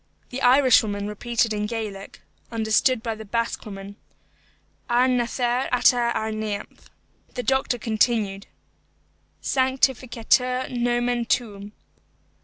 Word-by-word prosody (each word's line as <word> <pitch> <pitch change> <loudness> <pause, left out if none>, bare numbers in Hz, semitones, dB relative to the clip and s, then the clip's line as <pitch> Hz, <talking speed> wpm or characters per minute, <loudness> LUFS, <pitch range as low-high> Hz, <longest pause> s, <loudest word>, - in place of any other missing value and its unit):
The 260 +2 -5
Irishwoman 245 -6 +4
repeated 230 +2 -1
in 210 0 -2
Gaelic, 210 -4 -6 0.3
understood 225 +2 +2
by 230 - -2
the 220 0 -9
Basque 230 +2 -2
woman, 200 0 -9 0.9
"Ar 245 +2 +4
nathair 245 0 0
ata 245 -1 +3
ar 220 0 -2
neamh." 215 -2 -5 0.6
The 250 - -3
doctor 265 -1 +1
continued, 215 -3 0 1.0
"Sanctificetur 255 -1 +1
nomen 240 0 0
tuum." 205 -4 -2
235 Hz, 100 wpm, -24 LUFS, 215-250 Hz, 1.0 s, Irishwoman